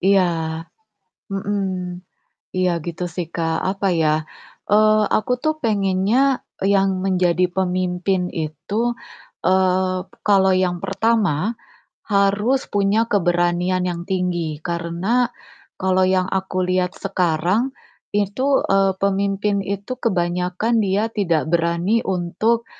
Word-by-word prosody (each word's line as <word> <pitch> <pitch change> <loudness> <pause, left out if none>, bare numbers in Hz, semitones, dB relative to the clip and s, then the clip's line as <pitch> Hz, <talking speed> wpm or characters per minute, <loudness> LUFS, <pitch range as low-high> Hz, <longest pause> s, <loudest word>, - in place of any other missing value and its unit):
Iya. 195 +1 +4 1.1
Mhm, 200 +1 -1 1.0
iya 185 -1 +2
gitu 175 +1 -4
sih, 175 -3 -3
Kak 165 -1 -1
apa 195 0 -1
ya, 155 -2 +1 0.5
eee, 215 +1 +5 0.2
aku 215 +4 -2
tuh 310 0 +2
pengennya 215 +5 +2 0.2
e - - 0
yang 195 0 +3 0.2
menjadi 180 -1 +2
pemimpin 185 0 0
itu, 160 +7 -3 0.6
eee, 185 0 +2 0.3
kalau 195 -2 +4
yang 185 -1 +1
pertama, 210 -2 +1 0.5
harus 205 +5 +2
punya 205 +3 +2
keberanian 175 -1 +1
yang 175 -1 -2
tinggi 175 -5 -1
karena 175 +8 0 0.5
kalau 185 0 +3
yang 185 0 +2
aku 190 -1 -1
lihat 185 0 0
sekarang 190 +6 0 0.4
itu, 220 +7 +1
eee, 195 0 +4
pemimpin 200 +1 +1 0.2
itu 200 +5 -7
kebanyakan 180 +1 0
dia 205 +4 0
tidak 170 -8 0
berani 170 +5 +2
untuk, 195 +6 0
190 Hz, 110 wpm, -21 LUFS, 175-205 Hz, 1.1 s, eee